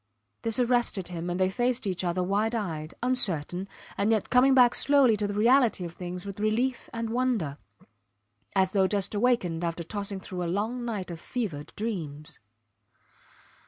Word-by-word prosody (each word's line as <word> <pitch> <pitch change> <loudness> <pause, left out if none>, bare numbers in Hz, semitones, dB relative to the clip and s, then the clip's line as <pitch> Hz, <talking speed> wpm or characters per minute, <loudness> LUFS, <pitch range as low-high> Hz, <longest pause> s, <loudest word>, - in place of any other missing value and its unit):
This 225 -1 -1
arrested 240 -7 +1
him, 175 0 -4
and 175 +1 -2
they 185 0 +2
faced 245 +2 0
each 185 -2 -1
other 180 +1 0
wide 210 +5 0
eyed, 160 -7 -4
uncertain, 190 -7 +1 0.3
and 200 +2 +1
yet 220 -3 +1
coming 260 +2 +5
back 245 -2 +6
slowly 275 -5 +4
to 205 0 -1
the 205 - -3
reality 230 -3 +3
of 170 - -7
things 180 +1 -6
with 200 0 -7
relief 235 +4 0
and 230 -1 -3
wonder, 230 - 0 1.0
as 190 -1 +3
though 190 -2 +3
just 200 0 -1
awakened 205 -7 +1
after 170 0 -2
tossing 200 +2 -4
through 185 -1 -6
a 170 - -2
long 220 +7 -2
night 205 -6 -4
of 165 - -7
fevered 170 - -4
dreams. 165 -8 -5
200 Hz, 165 wpm, -27 LUFS, 180-235 Hz, 1.0 s, back